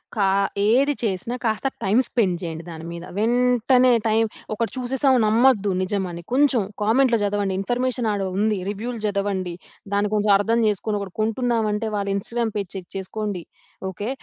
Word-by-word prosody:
కా 205 -3 +2 0.4
ఏది 270 +6 +4
చేసినా 215 +4 -2
కాస్త 220 +4 0 0.2
టైమ్ 215 +6 +3
స్పెండ్ 190 -8 +1
చేయండి 165 -2 -5
దాని 165 -1 -8
మీద. 170 0 -7
వెంటనే 250 +2 +3 0.2
టైమ్ 220 +1 +3 0.3
ఒకటి 225 0 -2
చూసేసాం 260 +1 +2
నమ్మొద్దు 215 -2 +4
నిజమని. 185 -3 -2
కొంచెం 270 -3 +4 0.2
కామెంట్‌లో 235 +2 +3
జదవండి. 200 -1 0
ఇన్ఫర్మేషన్ 245 +1 -1
ఆడ 205 -1 -1 0.2
ఉంది 210 0 +2
రివ్యూలు 225 +4 -4
జదవండి. 200 -3 -1 0.4
దాన్ని 205 0 +1
కొంచెం 210 0 +2
అర్థం 225 +3 +1
చేసుకొని 210 +1 -1
ఒకటి 190 -3 -7
కొంటున్నాం 225 0 0
అంటే 220 +1 -2
వాళ్ళ 200 -1 -2
ఇన్‌‌‌స్టాగ్రామ్ 230 +2 -2
పేజ్ 200 -3 -3
చెక్ 185 -2 -7
చేసుకోండి 195 -1 -4 0.5
ఓకే. 205 +5 -5
215 Hz, 150 wpm, -23 LUFS, 200-240 Hz, 0.5 s, ఏది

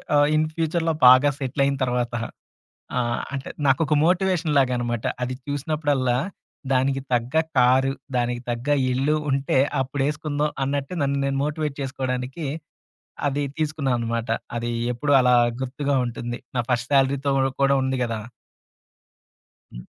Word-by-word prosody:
ఆహ్, 145 0 +5
ఇన్ 155 0 +3
ఫ్యూచర్‌లో 165 0 0
బాగా 130 +3 +7
సెటిల్ 135 +1 -1
అయిన 140 0 +1
తర్వాత. 125 -1 -1 0.8
ఆ! - - +3 0.3
అంటే 135 -1 -4 0.2
నాకొక 140 +3 +2
మోటివేషన్ 180 -3 +1
లాగనమాట. 120 -3 0 0.2
అది 125 +1 -3
చూసినప్పుడల్లా 145 -3 0 0.5
దానికి 135 +1 +2
తగ్గ 120 +4 0 0.2
కారు, 130 +2 +4 0.2
దానికి 120 0 0
తగ్గ 120 +2 -3 0.2
ఇల్లు 135 +4 +1
ఉంటే, 135 0 +1 0.2
అప్పుడేసుకుందాం 145 +2 -1
అన్నట్టు 140 +3 -2
నన్ను 140 0 +1
నేను 135 0 -1
మోటివేట్ 150 -1 -2
చేసుకోవడానికి, 130 +2 -3 0.8
అది 145 +1 0 0.2
తీసుకున్నా 150 -4 -1
అనమాట. 115 0 -2 0.3
అది 120 0 -2 0.2
ఎప్పుడూ 145 +5 0
అలా 125 -1 +4 0.3
గుర్తుగా 140 +2 -2
ఉంటుంది. 120 +1 -5 0.2
నా 120 - +2
ఫస్ట్ 120 +1 0
సాలరీతో 140 +1 +2
ఉడ 135 - +3 0.2
కూడా 140 0 +4
ఉంది 130 0 -1
గదా! 115 -2 -3 1.5
హ్మ్. - - -9
135 Hz, 130 wpm, -23 LUFS, 125-145 Hz, 1.5 s, బాగా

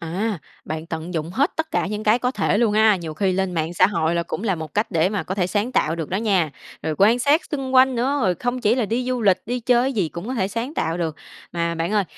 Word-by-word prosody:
À, 190 +5 -2 0.3
bạn 155 +1 -5
tận 165 +1 -5
dụng 160 +1 -2
hết 280 - +1
tất 320 0 -2
cả - - 0
những 210 +2 -4
cái 220 +3 +4
có 250 0 0
thể 205 -4 0
luôn 225 -2 +3
ha. 215 -1 +5
Nhiều 165 -3 -6
khi 190 +3 +1
lên 190 0 -1
mạng 165 0 -2
xã 175 - +5
hội 170 -4 0
cũng - - -4
là 200 -5 +1
một 160 -2 -7
cách 210 +2 0
để 165 0 +2
mà 205 0 -2
có 190 - -4
thể 185 -3 0
sáng 210 +6 -1
tạo 160 -9 +1
được 160 -3 -4
đó 185 - -1
nha, 195 -7 +1 0.3
rồi 160 - -1
quan 220 +5 +5
sát 285 +6 +3
xung 270 -3 -3
quanh 260 0 +6
nữa, 260 +4 0
rồi 185 -3 +2
không 245 +7 -2
chỉ 215 0 +3
là 245 -3 0
đi 240 +4 -1
du 250 -2 -1
lịch, 195 -3 +3
đi 245 +2 -2
chơi 240 +1 +3
cái 270 +2 0
gì 195 -8 0
cũng 170 +8 -7
có 260 - -2
thể 190 -4 0
sáng 235 +8 -4
tạo 165 - -1
được. 160 -2 -2 0.4
Mà 170 -1 -1
bạn 165 +4 -2
ơi, 205 -2 +2
205 Hz, 285 wpm, -22 LUFS, 170-240 Hz, 0.4 s, quanh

